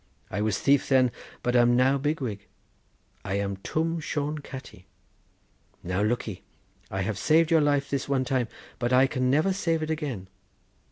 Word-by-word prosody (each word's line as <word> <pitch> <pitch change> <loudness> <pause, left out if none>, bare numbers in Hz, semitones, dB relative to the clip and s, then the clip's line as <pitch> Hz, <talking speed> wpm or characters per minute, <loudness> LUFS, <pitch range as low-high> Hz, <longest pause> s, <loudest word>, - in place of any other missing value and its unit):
I 105 - -2
was 105 -2 +1
thief 140 -1 +3
then, 130 -2 +4 0.3
but 125 0 0
am 120 0 +5
now 130 +2 +3
big 150 +2 -1
wig. 105 -5 -4 0.8
I 95 - -2
am 100 -1 -2
Twm 165 - -1
Shone 150 0 -2
Catti. 130 -9 -10 1.0
Now 90 +2 -1
lookee! 105 -3 -1 0.5
I 95 - -2
have 100 +1 -2
saved 160 +5 +3
your 165 -1 +5
life 145 -1 +2
this 140 -1 -3
one 135 -2 +1
time, 125 -2 0 0.3
but 120 0 0
I 130 +1 +6
can 130 -1 0
never 155 +8 +3
save 165 -4 0
it 155 - -2
again. 140 - -3
130 Hz, 170 wpm, -27 LUFS, 110-150 Hz, 1.0 s, I